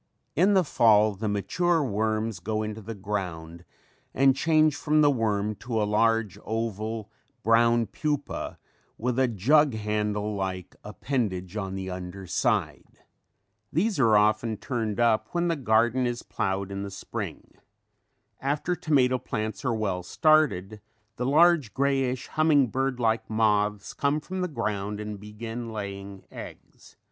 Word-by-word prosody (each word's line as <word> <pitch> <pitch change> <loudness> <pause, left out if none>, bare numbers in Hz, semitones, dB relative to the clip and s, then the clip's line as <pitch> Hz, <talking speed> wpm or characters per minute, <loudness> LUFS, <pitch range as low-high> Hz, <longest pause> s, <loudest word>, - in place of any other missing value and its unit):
In 195 +6 +4
the 190 - +5
fall 110 -7 +4
the 105 +3 -4
mature 165 - +1
worms 110 -2 -1
go 110 +4 -2
into 110 0 -5
the 110 +2 -7
ground 90 -5 -5 0.5
and 135 0 +5
change 155 0 +3
from 155 0 +2
the 145 -1 +5
worm 110 -4 0
to 115 -3 -3
a - - +2
large, 110 -1 +1
oval, 110 -1 -3 0.3
brown 115 +1 +4
pupa 145 +2 -3 0.4
with 125 +2 -1
a 130 - +4
jug 130 +5 +3
handle 105 0 -1
like 95 -2 -4
appendage 105 -5 -3
on 95 -3 -3
the 95 -1 -4
under 90 +1 -7
side. - - -1 0.7
These 195 +3 0
are 110 -5 +5
often 110 +1 +2
turned 115 -4 -3
up 115 -2 +3
when 175 0 +1
the 165 - +1
garden 120 -1 +2
is 120 -1 -4
plowed 95 0 -2
in 100 0 -4
the 100 - -4
spring. 100 - -7 0.9
After 150 +6 -1
tomato 130 -6 +2
plants 110 +4 -4
are 125 -3 0
well 100 -4 -1
started 110 - +2 0.4
the 125 - -1
large 155 -4 +4
greyish 135 -2 0
humming 150 -5 +3
bird 135 +1 -1
like 110 -1 0
moths 105 -2 +1
comes 145 +2 0
from 185 0 -4
the 180 - 0
ground 105 - -3
and 105 -1 -6
begin 115 +3 -7
laying 100 -2 -6
eggs. - - -12
110 Hz, 145 wpm, -27 LUFS, 105-135 Hz, 0.9 s, the